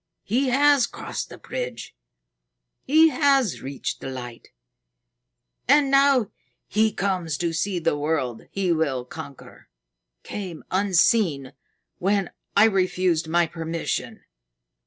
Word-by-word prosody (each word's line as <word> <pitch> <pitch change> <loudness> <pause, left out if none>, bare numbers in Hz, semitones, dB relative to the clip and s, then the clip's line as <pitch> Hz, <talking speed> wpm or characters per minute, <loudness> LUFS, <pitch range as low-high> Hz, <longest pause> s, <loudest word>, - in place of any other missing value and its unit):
He 255 +7 0
has 280 0 +4
crossed - - -6
the - - -10
bridge. - - -6 0.9
He 315 +4 +5
has 275 - +2
reached 135 0 -5
the - - -5
Light. 125 -3 -8 1.2
And 280 +1 +4
now 275 -5 +4 0.4
he 220 +1 +2
comes 180 -7 -2
to 170 -1 -2
see 180 +3 -1
the 165 -2 0
world 145 -6 -2
he 190 -3 -1
will 145 -6 0
conquer 140 0 -11 0.5
came 185 -6 -7
unseen 185 - +2 0.5
when 195 0 0 0.3
I 205 - +8
refused 185 -5 +1
my 170 +1 +2
permission." 165 0 -4
185 Hz, 115 wpm, -24 LUFS, 160-235 Hz, 1.2 s, I